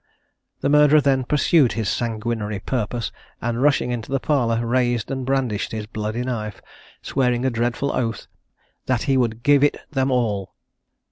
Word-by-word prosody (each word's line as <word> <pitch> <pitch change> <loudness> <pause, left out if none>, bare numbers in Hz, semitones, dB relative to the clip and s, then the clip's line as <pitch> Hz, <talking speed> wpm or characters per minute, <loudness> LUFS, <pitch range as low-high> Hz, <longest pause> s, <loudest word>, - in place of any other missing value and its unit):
The 140 - +1
murderer 150 +1 +6
then 135 -3 +2
pursued 150 -1 +3
his 110 -3 -2
sanguinary 110 -2 -2
purpose, 115 +2 -3 0.3
and 120 0 -2
rushing 135 -3 +2
into 120 +1 -4
the 135 - +1
parlour, 120 -6 +1
raised 120 -1 0
and 130 -1 -3
brandished 130 -7 -1
his 110 -1 -4
bloody 110 +2 -3
knife, 110 -5 -4 0.4
swearing 125 -2 0
a 130 - +2
dreadful 120 +4 -1
oath, 115 -3 -2 0.6
that 125 -3 +1
"he 135 -2 +1
would 120 -3 0
give 145 0 +5
it 145 - +3
them 135 -2 +1
all." 110 -7 -1
120 Hz, 155 wpm, -22 LUFS, 115-135 Hz, 0.6 s, murderer